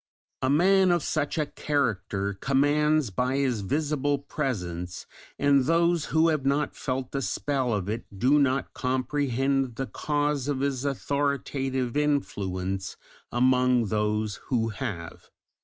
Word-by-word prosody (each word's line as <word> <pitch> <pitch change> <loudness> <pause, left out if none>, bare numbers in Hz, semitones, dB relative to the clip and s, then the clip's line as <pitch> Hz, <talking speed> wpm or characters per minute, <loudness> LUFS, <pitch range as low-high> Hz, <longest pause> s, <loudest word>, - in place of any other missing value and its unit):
A 130 - +1
man 190 +6 +4
of 175 -2 +2
such 155 0 -1
a 155 - +1
character 110 -10 -1
commands 145 +4 +2
by 125 +6 0
his 130 -6 0
visible 145 +4 0
presence, 90 - -4 0.3
and 140 -2 +3
those 170 +1 +2
who 160 +1 +3
have 155 -4 0
not 140 +2 0
felt 130 -1 -3
the 140 - -2
spell 135 -2 -1
of 100 -4 -1
it 110 +3 -3
do 130 +8 +4
not 135 -1 +1
comprehend 130 0 0
the 135 - -2
cause 145 0 -1
of 140 -2 -1
his 140 -1 -1
authoritative 135 -2 -1
influence 95 -10 -1 0.3
among 125 -2 +3
those 105 0 0
who 115 -3 +1
have. 100 -8 -6
135 Hz, 130 wpm, -27 LUFS, 115-145 Hz, 0.3 s, man